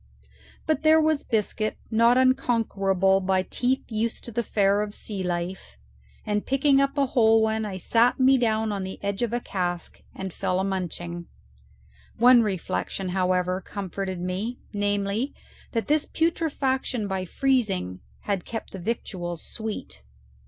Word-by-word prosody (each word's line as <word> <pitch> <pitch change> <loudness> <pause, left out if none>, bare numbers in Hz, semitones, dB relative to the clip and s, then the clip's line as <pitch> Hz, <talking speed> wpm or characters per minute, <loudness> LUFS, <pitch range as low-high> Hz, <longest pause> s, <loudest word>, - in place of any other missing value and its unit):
But 315 - +1
there 315 0 +6
was 310 -2 +2
biscuit 215 -1 -1
not 230 +2 +5
unconquerable 205 -7 +2
by 185 0 +1
teeth 255 +6 -1
used 225 +1 -2
to 235 - -6
the 235 - 0
fare 205 -2 +2
of 210 - -2
the - - -6
sea 205 -3 -4
life, 175 - -4 0.5
and 210 0 0
picking 275 +1 +3
up 275 +1 0
a 280 - +4
whole 225 -3 +4
one, 220 0 0
I 195 -3 -4
sat 230 +7 +3
me 260 0 +5
down 220 -2 +1
on 200 -1 -2
the 190 0 -5
edge 200 +1 -2
of 240 -2 0
a 240 - 0
cask 175 -6 -3
and 190 -2 -5
fell 185 -1 -1
a - - +1
munching. 175 -2 -4 0.9
One 245 +1 +7
reflection, 195 -1 -2
however, 185 0 +1
comforted 190 -1 -5
me, 190 +7 -3 0.2
namely, 205 +4 -1 0.4
that 225 -3 0
this 300 +4 +1
petrifaction 270 -8 0
by 190 -1 -2
freezing 200 - 0 0.2
had 195 -4 -2
kept 225 - -6
the 190 - -7
victuals 175 -4 -4
sweet. 215 - -5
210 Hz, 150 wpm, -25 LUFS, 190-245 Hz, 0.9 s, One